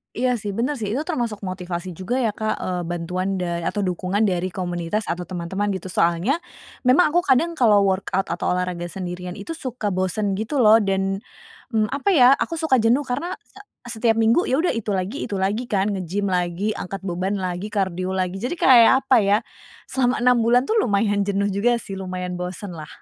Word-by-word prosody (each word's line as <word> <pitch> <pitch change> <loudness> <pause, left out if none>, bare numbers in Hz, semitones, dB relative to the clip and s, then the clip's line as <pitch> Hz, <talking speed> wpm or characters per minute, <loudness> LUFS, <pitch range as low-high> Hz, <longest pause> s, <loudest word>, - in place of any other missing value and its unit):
Iya 250 0 +1
sih, 205 -2 -4
bener 255 +6 -1
sih, 210 -1 -2
itu 280 - -1
termasuk 240 - -3
motivasi 185 -1 -5
juga 185 +7 -4
ya 225 - +2
Kak. 215 +1 -2
Eee, 180 -1 -2
bantuan 180 +3 -2
dan 175 -2 -2
atau 205 - -1
dukungan 185 +2 -1
dari 185 -4 +1
komunitas 180 +2 -3
atau 175 +1 -3
teman-teman 185 +3 -3
gitu 185 0 -6
soalnya 175 - +1 0.5
memang 275 +8 +5
aku 340 - +2
kadang 280 +5 +3
kalo 210 -5 +5
workout 190 0 0
atau 170 - -2
olahraga 180 -1 -2
sendirian 180 0 -6
itu 200 +8 -9
suka 245 -6 -3
bosen 190 +2 -1
gitu 245 +5 0
loh 215 0 +7
dan, 195 -2 0 0.6
mmm, 215 -1 +2
apa 280 +8 0
ya 255 -5 +7
aku - - -2
suka 315 -5 +2
jenuh 235 +5 +3
karena 290 +7 -3
se - - -19 0.4
setiap 225 0 +3
minggu 225 +10 +3
ya 260 - +1
udah 355 - +2
itu 220 -3 -2
lagi 190 +8 -3
itu 210 - -5
lagi 200 +5 -1
kan, 200 -2 0
nge-gym 195 +1 -2
lagi, 180 +3 0
angkat 195 +2 -6
beban 185 +1 -2
lagi, 185 0 -3
kardio 190 -2 -1
lagi, 185 0 -2
jadi 245 - -3
kayak 245 -8 +7 0.2
apa 260 - +5
ya? 205 -1 +3 0.5
Selama 250 -2 +1
6 250 0 +5
bulan 235 +2 +4
tuh 440 - 0
lumayan 205 - +1
jenuh 200 0 0
juga 205 +5 +2
sih 195 -1 -6
lumayan 180 -1 -4
bosen 180 +3 -5
lah. 160 -3 -8
200 Hz, 195 wpm, -22 LUFS, 185-235 Hz, 0.6 s, loh